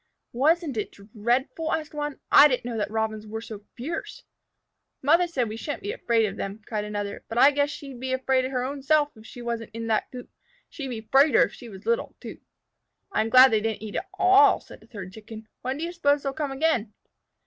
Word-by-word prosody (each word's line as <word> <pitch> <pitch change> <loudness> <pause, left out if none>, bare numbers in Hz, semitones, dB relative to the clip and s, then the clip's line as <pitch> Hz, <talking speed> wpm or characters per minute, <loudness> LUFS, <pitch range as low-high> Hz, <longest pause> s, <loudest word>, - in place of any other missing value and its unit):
"Wasn't 300 +1 +1
it 210 - -3
dreadful?" 240 +9 -2
asked 310 -2 -2
one. 295 -1 -4
"I 285 - +9
didn't 250 -4 -2
know 240 -1 -4
that 210 - -1
Robins 220 -1 -2
were 220 +1 -5
so 220 -2 -8 0.2
fierce." 325 - -5 0.8
"Mother 335 +5 +4
said 280 -7 -1
that - - -6
we 220 - -6
shouldn't 290 +9 -5
be 410 - -2
afraid 230 - +1
of 200 -1 -4
them," 195 +2 -5
cried 210 -2 -3
another, 205 -1 -5
"but 225 - -5
I 275 +4 +7
guess 285 0 +1
she'd 275 -4 -8
be 260 +1 -4
afraid 260 0 +1
her 255 -1 -2
own 275 +2 -4
self 295 +1 +2
if 220 0 -14
she 245 - -10
wasn't 230 -2 -4
in 230 0 -4
that 220 - 0
coop. 250 -1 -9 0.4
She'd 280 -4 -6
be 235 -4 -5
'fraider 275 +6 +5
if - - -11
she 240 - -11
was 195 -1 -12
little, 470 +1 -1
too." - - -9 0.7
"I'm 220 - 0
glad 255 +2 +8
they 220 -1 +2
didn't 220 -1 -3
eat 210 -2 -6
it - - -1 0.2
all," 390 +3 +6
said - - -15
a - - -19
third 190 -5 -9
Chicken. 220 +1 -11
"When 260 +2 -3
do 315 - -4
you 340 - -3
suppose 290 -5 +1
they'll 275 -1 -2
come 290 -1 -3
again?" 265 -7 0
255 Hz, 225 wpm, -25 LUFS, 220-290 Hz, 0.8 s, I